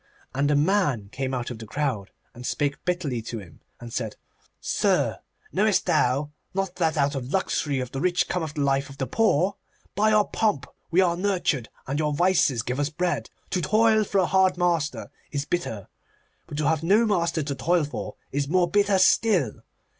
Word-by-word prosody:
And 140 Hz, +2 st, +1 dB
a 150 Hz, -, +3 dB
man 145 Hz, -, +1 dB
came 130 Hz, +3 st, -3 dB
out 125 Hz, -1 st, -3 dB
of 115 Hz, -, -7 dB
the 110 Hz, -, -8 dB
crowd 125 Hz, -8 st, -2 dB, 0.2 s
and 120 Hz, -, -10 dB
spake 145 Hz, +2 st, -1 dB
bitterly 170 Hz, -10 st, -1 dB
to 115 Hz, +1 st, -6 dB
him, 90 Hz, -7 st, -12 dB, 0.2 s
and 120 Hz, -1 st, -9 dB
said, 110 Hz, -4 st, -3 dB, 0.4 s
'Sir, -, -, +1 dB, 0.3 s
knowest -, -, +2 dB
thou 140 Hz, +4 st, +1 dB, 0.2 s
not 195 Hz, -2 st, -2 dB
that 160 Hz, -3 st, +1 dB
out 140 Hz, 0 st, +2 dB
of 130 Hz, -3 st, -4 dB
the -, -, -9 dB
luxury 145 Hz, -7 st, -1 dB
of 125 Hz, -1 st, -4 dB
the 135 Hz, -, -4 dB
rich 175 Hz, 0 st, +2 dB
cometh 160 Hz, -4 st, -3 dB
the 150 Hz, -, -1 dB
life 140 Hz, 0 st, +1 dB
of 140 Hz, -, -11 dB
the 135 Hz, -, -1 dB
poor? 195 Hz, -, +2 dB, 0.4 s
By 215 Hz, +2 st, +3 dB
your 215 Hz, -1 st, +4 dB
pomp 180 Hz, -12 st, 0 dB, 0.2 s
we 175 Hz, +3 st, +4 dB
are 175 Hz, -2 st, +2 dB
nurtured, 175 Hz, -, 0 dB, 0.2 s
and 140 Hz, +3 st, -2 dB
your 150 Hz, -1 st, 0 dB
vices 160 Hz, -, +3 dB
give 125 Hz, +3 st, -3 dB
us 145 Hz, 0 st, +1 dB
bread. 175 Hz, +3 st, -2 dB, 0.2 s
To 180 Hz, -, 0 dB
toil 220 Hz, +2 st, +4 dB
for 200 Hz, -, -2 dB
a 190 Hz, -, +4 dB
hard 190 Hz, 0 st, +3 dB
master 170 Hz, -4 st, 0 dB, 0.2 s
is 145 Hz, -1 st, -2 dB
bitter, 130 Hz, -, -3 dB, 0.6 s
but 145 Hz, -, -7 dB
to 150 Hz, -1 st, +1 dB
have 160 Hz, -1 st, +2 dB
no 205 Hz, +8 st, +4 dB
master 170 Hz, -6 st, +1 dB
to 140 Hz, 0 st, -3 dB
toil 170 Hz, +4 st, +1 dB
for 145 Hz, -, -5 dB, 0.2 s
is 140 Hz, 0 st, -1 dB
more 175 Hz, +3 st, +3 dB
bitter 200 Hz, +2 st, +3 dB
still. 185 Hz, -, +3 dB
150 Hz, 195 wpm, -25 LUFS, 135-185 Hz, 0.6 s, your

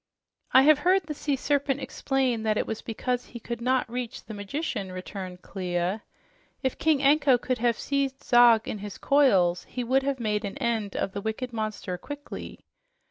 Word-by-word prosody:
"I 260 Hz, -, +7 dB
have 300 Hz, 0 st, +6 dB
heard 370 Hz, +4 st, +3 dB
the 305 Hz, -1 st, -5 dB
sea 290 Hz, -1 st, -1 dB
serpent 280 Hz, 0 st, 0 dB
explain 265 Hz, -3 st, -1 dB
that 215 Hz, -1 st, +1 dB
it -, -, 0 dB
was 220 Hz, -, -4 dB
because 245 Hz, +2 st, -2 dB
he 235 Hz, -, -10 dB
could 235 Hz, +1 st, -6 dB
not 255 Hz, +1 st, +1 dB
reach 245 Hz, +1 st, -5 dB
the 220 Hz, -, -8 dB
magician," 205 Hz, -, -4 dB
returned 185 Hz, 0 st, -7 dB
Clia. 180 Hz, +1 st, -2 dB, 0.6 s
"If 260 Hz, -, -1 dB
King 310 Hz, -3 st, +2 dB
Anko 280 Hz, -2 st, +5 dB
could 250 Hz, 0 st, -2 dB
have 235 Hz, -1 st, +2 dB
seized 275 Hz, -1 st, -2 dB
Zog 240 Hz, -2 st, +6 dB
in 210 Hz, -, -4 dB
his 205 Hz, 0 st, -7 dB
coils, 195 Hz, -12 st, +3 dB
he 250 Hz, -, -4 dB
would 260 Hz, +3 st, +2 dB
have 270 Hz, -1 st, -2 dB
made 210 Hz, -2 st, -1 dB
an 200 Hz, +5 st, -5 dB
end 230 Hz, -6 st, -1 dB
of -, -, -1 dB
the 200 Hz, -, -5 dB
wicked 225 Hz, +4 st, -4 dB
monster 215 Hz, -5 st, -3 dB
quickly. 290 Hz, +5 st, -8 dB
240 Hz, 185 wpm, -27 LUFS, 210-275 Hz, 0.6 s, I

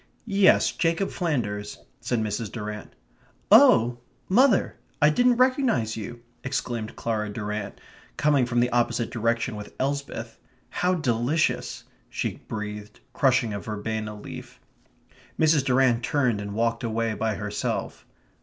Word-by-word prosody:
"Yes, 200 Hz, -3 st, +4 dB
Jacob 165 Hz, +3 st, 0 dB
Flanders," 105 Hz, -, -2 dB, 0.2 s
said 120 Hz, -3 st, -1 dB
Mrs. 110 Hz, 0 st, -3 dB
Durrant. 105 Hz, -2 st, -6 dB, 0.6 s
"Oh, 120 Hz, +2 st, +6 dB, 0.3 s
mother! 235 Hz, +2 st, +3 dB, 0.2 s
I 150 Hz, 0 st, +5 dB
didn't 245 Hz, +9 st, +4 dB
recognize 255 Hz, -, +2 dB
you!" 115 Hz, +2 st, -7 dB, 0.2 s
exclaimed 120 Hz, -4 st, -3 dB
Clara 110 Hz, -2 st, -2 dB
Durrant, 105 Hz, -1 st, -5 dB, 0.4 s
coming 145 Hz, -4 st, +3 dB
from 120 Hz, 0 st, +1 dB
the 125 Hz, +1 st, +1 dB
opposite 120 Hz, -1 st, 0 dB
direction 115 Hz, 0 st, -1 dB
with 105 Hz, 0 st, -9 dB
Elsbeth. 140 Hz, +1 st, -3 dB, 0.3 s
"How 180 Hz, +1 st, +1 dB
delicious," 135 Hz, +1 st, 0 dB, 0.3 s
she -, -, -3 dB
breathed, 105 Hz, -1 st, -6 dB
crushing 125 Hz, -5 st, +2 dB
a 100 Hz, -, -3 dB
verbena 110 Hz, 0 st, -4 dB
leaf. -, -, -10 dB, 0.8 s
Mrs. 155 Hz, -3 st, +4 dB
Durrant 130 Hz, -2 st, +3 dB
turned 125 Hz, -5 st, 0 dB
and 100 Hz, 0 st, -6 dB
walked 115 Hz, +2 st, 0 dB
away 115 Hz, 0 st, -1 dB
by 110 Hz, 0 st, -1 dB
herself. 105 Hz, 0 st, -4 dB
120 Hz, 125 wpm, -25 LUFS, 110-145 Hz, 0.8 s, Oh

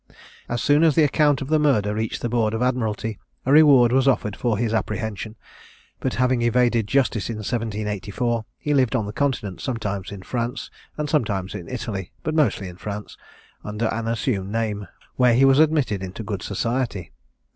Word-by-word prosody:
As 120 Hz, 0 st, -2 dB
soon 145 Hz, +1 st, +4 dB
as 160 Hz, -4 st, +4 dB
the 160 Hz, -, +5 dB
account 145 Hz, -1 st, +3 dB
of -, -, -7 dB
the 155 Hz, 0 st, +3 dB
murder 110 Hz, -9 st, +2 dB
reached 110 Hz, +1 st, -3 dB
the -, -, +1 dB
board 115 Hz, -2 st, +1 dB
of 110 Hz, -, -3 dB
admiralty, 115 Hz, -4 st, -1 dB, 0.3 s
a 130 Hz, -, +1 dB
reward 140 Hz, -5 st, +7 dB
was 135 Hz, +1 st, +3 dB
offered 105 Hz, -6 st, +1 dB
for 115 Hz, -4 st, 0 dB
his 115 Hz, 0 st, -1 dB
apprehension; 110 Hz, 0 st, -3 dB, 0.6 s
but, 130 Hz, -, -2 dB
having 125 Hz, -1 st, +2 dB
evaded 120 Hz, -2 st, +2 dB
justice 125 Hz, -7 st, +1 dB
in 115 Hz, -, -3 dB
1784, 110 Hz, +1 st, -2 dB
he 150 Hz, -, -1 dB
lived 130 Hz, -3 st, +2 dB
on 110 Hz, -4 st, 0 dB
the 105 Hz, -, -6 dB
Continent, 115 Hz, -9 st, -2 dB
sometimes 105 Hz, -7 st, -3 dB
in 100 Hz, -2 st, -8 dB
France, 120 Hz, +4 st, -3 dB, 0.3 s
and 150 Hz, 0 st, -2 dB
sometimes 105 Hz, -, -1 dB
in 85 Hz, -, -7 dB
Italy, 105 Hz, -7 st, -5 dB
but 155 Hz, -, -2 dB
mostly 130 Hz, -11 st, +1 dB
in 90 Hz, -1 st, -10 dB
France, 105 Hz, +2 st, -6 dB, 0.5 s
under 105 Hz, +2 st, -3 dB
an 115 Hz, 0 st, -3 dB
assumed 105 Hz, -4 st, -1 dB
name, 105 Hz, -3 st, -2 dB, 0.3 s
where 125 Hz, -2 st, +5 dB
he 135 Hz, +3 st, +5 dB
was 135 Hz, +1 st, +5 dB
admitted 150 Hz, -10 st, +2 dB
into 95 Hz, +4 st, -6 dB
good 100 Hz, -2 st, -4 dB
society. 115 Hz, -3 st, -2 dB
115 Hz, 180 wpm, -23 LUFS, 105-130 Hz, 0.6 s, reward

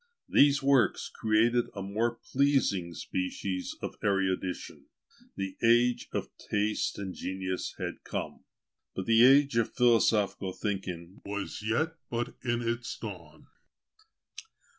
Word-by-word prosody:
These 140 Hz, -1 st, +4 dB
works 135 Hz, -2 st, +3 dB
created 115 Hz, +2 st, +2 dB
a 100 Hz, -, -4 dB
more 110 Hz, +4 st, -1 dB, 0.2 s
pleasing 130 Hz, -11 st, +2 dB
species 90 Hz, +1 st, -3 dB
of -, -, -5 dB
erudition: 95 Hz, -2 st, -1 dB, 0.5 s
the 95 Hz, -1 st, -4 dB
age 120 Hz, +1 st, +3 dB
of -, -, -4 dB
taste 105 Hz, +1 st, -1 dB
and 95 Hz, -2 st, -5 dB
genius 95 Hz, -1 st, -4 dB
had -, -, -5 dB
come; -, -, -5 dB, 0.5 s
but 95 Hz, -, -3 dB
the 115 Hz, 0 st, +5 dB
age 140 Hz, -1 st, +6 dB
of 115 Hz, -, 0 dB
philosophical 110 Hz, -5 st, +3 dB
thinking 95 Hz, -4 st, -5 dB
was 100 Hz, 0 st, -5 dB
yet 155 Hz, +10 st, 0 dB
but 120 Hz, 0 st, -2 dB
in 120 Hz, -1 st, 0 dB
its 120 Hz, 0 st, -2 dB
dawn. -, -, -9 dB
110 Hz, 120 wpm, -29 LUFS, 95-120 Hz, 0.5 s, age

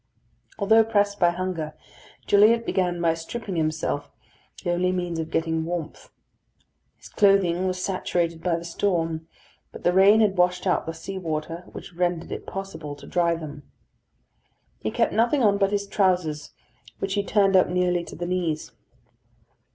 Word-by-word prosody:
Although 220 Hz, +2 st, +5 dB
pressed 205 Hz, -2 st, +1 dB
by 175 Hz, -, +5 dB
hunger, 175 Hz, -3 st, -3 dB, 0.5 s
Gilliatt 220 Hz, +3 st, +5 dB
began 180 Hz, -2 st, 0 dB
by 165 Hz, -1 st, +2 dB
stripping 190 Hz, +5 st, -6 dB
himself, 155 Hz, -2 st, -1 dB, 0.5 s
the 175 Hz, -, 0 dB
only 180 Hz, +1 st, +1 dB
means 175 Hz, -2 st, -2 dB
of 160 Hz, 0 st, -3 dB
getting 160 Hz, 0 st, 0 dB
warmth. 165 Hz, -1 st, -5 dB, 0.9 s
His -, -, -14 dB
clothing 190 Hz, -3 st, +3 dB
was 185 Hz, 0 st, -2 dB
saturated 170 Hz, -3 st, -1 dB
by 175 Hz, -1 st, +1 dB
the 170 Hz, 0 st, -5 dB
storm, 165 Hz, -3 st, -1 dB, 0.4 s
but -, -, -11 dB
the 175 Hz, -, +3 dB
rain 195 Hz, +3 st, +6 dB
had 205 Hz, -3 st, +2 dB
washed 180 Hz, +1 st, +2 dB
out 180 Hz, -, +1 dB
the 165 Hz, -, -4 dB
sea 190 Hz, +4 st, -6 dB
water, 165 Hz, 0 st, -4 dB
which -, -, -10 dB
rendered 175 Hz, -1 st, -1 dB
it -, -, -6 dB
possible 195 Hz, -7 st, -6 dB
to 145 Hz, -, -13 dB
dry 170 Hz, -1 st, +1 dB
them. 155 Hz, -3 st, -8 dB, 1.2 s
He 110 Hz, -, -2 dB
kept -, -, 0 dB
nothing 240 Hz, +5 st, +2 dB
on 200 Hz, -2 st, +3 dB
but 195 Hz, -1 st, +3 dB
his 200 Hz, -1 st, 0 dB
trousers, 180 Hz, -7 st, 0 dB, 0.5 s
which 195 Hz, 0 st, -3 dB
he 200 Hz, -, +1 dB
turned 200 Hz, -2 st, +3 dB
up 185 Hz, -, +5 dB
nearly 180 Hz, -1 st, +1 dB
to -, -, -9 dB
the 175 Hz, -, -4 dB
knees. 175 Hz, -4 st, -2 dB
180 Hz, 160 wpm, -25 LUFS, 165-195 Hz, 1.2 s, rain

